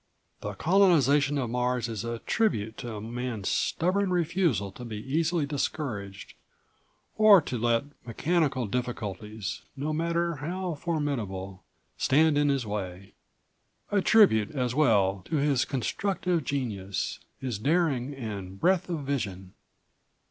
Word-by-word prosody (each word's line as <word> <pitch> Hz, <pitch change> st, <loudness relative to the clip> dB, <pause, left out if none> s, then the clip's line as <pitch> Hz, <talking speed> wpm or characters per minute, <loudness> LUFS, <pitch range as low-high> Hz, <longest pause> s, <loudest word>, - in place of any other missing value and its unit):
The 105 Hz, -, -5 dB
colonization 145 Hz, -, +4 dB
of 125 Hz, -4 st, -2 dB
Mars 125 Hz, -1 st, 0 dB
is 110 Hz, -4 st, -4 dB
a 115 Hz, 0 st, -3 dB
tribute 110 Hz, -, 0 dB
to 120 Hz, -5 st, -6 dB
Man's 115 Hz, -1 st, -4 dB
stubborn 190 Hz, +3 st, +1 dB
refusal 165 Hz, -, +1 dB
to 125 Hz, -, -10 dB
be 110 Hz, -3 st, -6 dB
easily 155 Hz, +7 st, 0 dB
discouraged 120 Hz, -9 st, -4 dB, 0.9 s
or 215 Hz, -3 st, +9 dB
to 130 Hz, -, -4 dB
let 115 Hz, 0 st, +2 dB, 0.2 s
mechanical 135 Hz, +1 st, 0 dB
difficulties, 105 Hz, -3 st, -4 dB, 0.2 s
no 150 Hz, +3 st, -2 dB
matter 170 Hz, +1 st, 0 dB
how 175 Hz, +5 st, -3 dB
formidable, 115 Hz, -, -3 dB, 0.4 s
stand 155 Hz, +2 st, +4 dB
in 145 Hz, 0 st, +3 dB
his 135 Hz, -4 st, 0 dB
way. 95 Hz, -3 st, -5 dB, 0.8 s
A 205 Hz, -1 st, +3 dB
tribute 185 Hz, -, +5 dB
as 125 Hz, -5 st, -1 dB
well 100 Hz, -9 st, +3 dB
to -, -, -3 dB
his 140 Hz, -4 st, +2 dB
constructive 175 Hz, -, -1 dB
genius, 105 Hz, -9 st, -3 dB, 0.2 s
his 125 Hz, -6 st, -3 dB
daring 145 Hz, -2 st, +1 dB
and 100 Hz, -6 st, -6 dB
breadth 185 Hz, -, +2 dB
of 165 Hz, -4 st, -2 dB
vision." 100 Hz, -10 st, -3 dB
130 Hz, 125 wpm, -28 LUFS, 110-160 Hz, 0.9 s, or